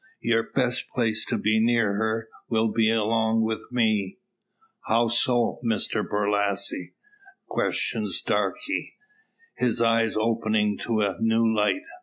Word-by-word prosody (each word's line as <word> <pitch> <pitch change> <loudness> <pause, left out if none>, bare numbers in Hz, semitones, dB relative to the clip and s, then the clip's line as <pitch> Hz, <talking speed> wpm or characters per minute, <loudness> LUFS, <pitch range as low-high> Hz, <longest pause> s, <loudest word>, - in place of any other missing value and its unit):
Your 115 -1 +2
best 125 -2 -1
place, 115 -3 0
to - - -1
be 110 +1 +1
near 115 -2 +2
her, 110 +2 -1 0.2
will 110 -1 +1
be 110 0 +2
along 110 0 +1
with 110 0 -2
me." 110 -5 0 0.7
"How 115 +1 +2
so, 120 0 +2
Mr 110 -1 0
Borlasse?" 100 -2 -1 0.5
questions - - -1
Darke, - - 0 1.0
his 125 -2 0
eyes 115 -1 +2
opening 110 -2 +1
to 110 -2 +1
a 95 -3 -1
new 115 0 +2
light. 110 - +1
110 Hz, 125 wpm, -25 LUFS, 105-115 Hz, 1.0 s, Your